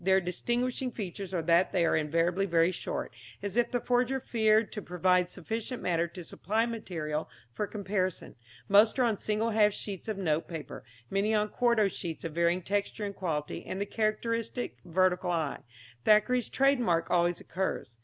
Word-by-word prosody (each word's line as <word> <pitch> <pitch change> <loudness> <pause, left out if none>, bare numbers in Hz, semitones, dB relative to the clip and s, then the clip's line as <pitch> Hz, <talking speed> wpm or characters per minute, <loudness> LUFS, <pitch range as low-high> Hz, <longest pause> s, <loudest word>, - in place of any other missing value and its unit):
Their 190 +1 +4
distinguishing 240 +8 -1
features 195 -4 -6
are 175 -3 -1
that 170 +2 +3
they 175 -2 +2
are - - +2
invariably 170 +5 +1
very 170 0 +3
short, - - -4 0.3
as 200 0 -4
if 240 0 +2
the 245 - 0
forger 250 +2 +1
feared 220 -3 +2
to 210 - -5
provide 180 0 +2
sufficient 225 +7 -4
matter 170 -1 +1
to 175 +1 -9
supply 215 +7 -1
material 165 -10 -4 0.2
for 210 - -2
comparison; 190 -3 -2 0.3
most 210 +4 +5
are 255 - +3
on 225 -4 +1
single 215 +2 0
half 210 -1 +4
sheets 200 -1 -6
of 215 -2 -2
note 160 -4 0
paper, 160 -3 -7 0.3
many 205 +3 +1
on 210 0 +1
quarto 235 -4 +3
sheets 170 -4 -5
of 165 - -4
varying 170 +2 +1
texture 205 +2 -2
and 200 -1 -5
quality, 155 -5 -3
and 190 - -5
the 200 - 0
characteristic 230 +3 -2
vertical 180 0 +1
I, 160 -5 -1 0.4
Thackeray's 235 +3 +4
trade 275 0 +3
mark, 170 -8 +1
always 175 0 +2
occurs. 185 - -3
195 Hz, 175 wpm, -30 LUFS, 175-220 Hz, 0.4 s, most